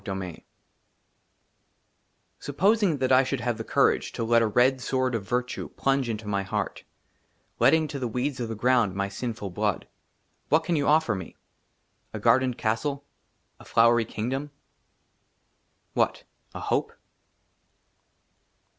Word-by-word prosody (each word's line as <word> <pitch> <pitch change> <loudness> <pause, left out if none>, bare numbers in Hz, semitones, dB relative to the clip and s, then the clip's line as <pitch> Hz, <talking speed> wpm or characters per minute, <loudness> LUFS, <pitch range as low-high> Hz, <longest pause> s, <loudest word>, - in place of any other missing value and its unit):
30 - - -15
J 95 -1 -2 0.2
XXX - - -33 2.0
SUPPOSING 195 +3 +2
THAT 130 -1 0
I 130 +1 +6
SHOULD 130 -1 -3
HAVE 120 -1 -1
THE - - -3
COURAGE - - +2
TO - - -3
LET 115 +1 +4
A 115 - +2
RED 125 +4 +3
SWORD 130 0 0
OF 115 -3 -2
VIRTUE 125 +1 -2
PLUNGE 135 -2 +1
INTO 110 -1 -4
MY 100 -1 0
HEART, 95 - -3 0.8
LETTING 160 -1 +4
TO 145 -2 -5
THE 125 - -2
WEEDS 125 +3 -2
OF 120 -2 -3
THE 115 - -4
GROUND 120 -4 +2
MY 100 0 -1
SINFUL 110 -2 -5
BLOOD, 105 +1 -1 0.6
WHAT 160 +1 +3
CAN 170 0 0
YOU 145 -2 0
OFFER 155 -6 +3
ME? 95 -4 -7 0.8
A - - -4
GARDENED 130 -1 +3
CASTLE? 140 +6 -2 0.5
A - - -13
FLOWERY 115 0 +4
KINGDOM? 130 +8 -3 1.4
WHAT? - - 0 0.3
A - - -4
HOPE - - -1
125 Hz, 145 wpm, -26 LUFS, 110-135 Hz, 2.0 s, I